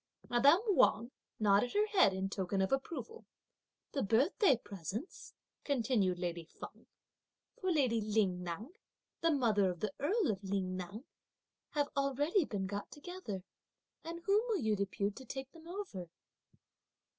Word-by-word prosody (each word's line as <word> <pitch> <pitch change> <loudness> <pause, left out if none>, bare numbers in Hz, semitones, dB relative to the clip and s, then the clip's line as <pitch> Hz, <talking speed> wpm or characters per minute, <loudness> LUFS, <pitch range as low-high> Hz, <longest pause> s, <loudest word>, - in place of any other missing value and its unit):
Madame 280 +9 +6
Wang 240 - +4 0.3
nodded 210 +3 +3
her 420 +1 +3
head 405 - +4
in 190 0 -2
token 195 0 -2
of 190 - +1
approval. 335 +12 -3 0.7
"The 275 - -1
birthday 270 - +4
presents," 205 - -7 0.3
continued 230 -9 +1
lady 175 -1 -3
Feng, 160 - -11 0.7
"for 375 -1 0
lady 255 -8 +2
Ling 205 -4 +1
Ngan, 180 - -5 0.5
the 330 - +3
mother 225 - +3
of 175 -2 -4
the 210 0 -2
Earl 365 - +2
of 195 -1 -5
Ling 190 -1 -1
Ngan, 200 +8 -6 0.7
have 290 -1 +1
already 285 +6 +2
been 200 -6 -3
got 200 +1 -4
together, 295 - -7 0.6
and 335 +1 -6
whom 400 +3 +4
will 435 -6 0
you 220 -1 +2
depute 200 +1 -1
to 265 - -9
take 265 +2 -6
them 330 0 -14
over?" 345 - -6
230 Hz, 145 wpm, -34 LUFS, 195-310 Hz, 0.7 s, Madame